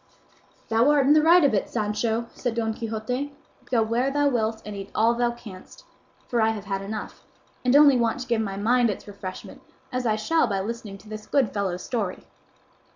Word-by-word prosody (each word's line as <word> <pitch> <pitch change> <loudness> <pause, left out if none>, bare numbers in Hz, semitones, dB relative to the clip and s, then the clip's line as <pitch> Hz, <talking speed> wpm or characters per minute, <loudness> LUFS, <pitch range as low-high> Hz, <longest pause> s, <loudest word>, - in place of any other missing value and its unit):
"Thou 230 +4 +4
art 290 -2 +4
in 285 - +6
the 305 - +5
right 335 +2 +6
of 280 - +4
it, 200 - 0
Sancho," 220 +1 -1
said 245 -3 -3
Don 225 -1 -1
Quixote; 235 +6 -4 0.3
"go 235 -3 +2
where 235 +4 0
thou 290 +1 +2
wilt 225 -3 -1
and 210 -1 -6
eat 195 0 -7
all 225 +2 +4
thou 240 0 +1
canst, 220 -6 -11 0.4
for 240 -3 0
I 220 - +4
have 215 -2 -4
had 195 -1 -3
enough, 210 +2 -7 0.4
and 250 +1 +3
only 285 -3 +7
want 230 +1 0
to 255 - -6
give 235 -2 +1
my 195 -2 -4
mind 235 +3 +3
its 205 - -5
refreshment, 195 -2 -8 0.3
as 255 -1 -1
I 215 - +2
shall 265 +7 +1
by 200 -3 -1
listening 215 -1 -6
to 195 - -18
this 215 0 -8
good 270 -6 +1
fellow's 190 -3 -2
story." 210 -7 -3
225 Hz, 205 wpm, -25 LUFS, 210-250 Hz, 0.4 s, only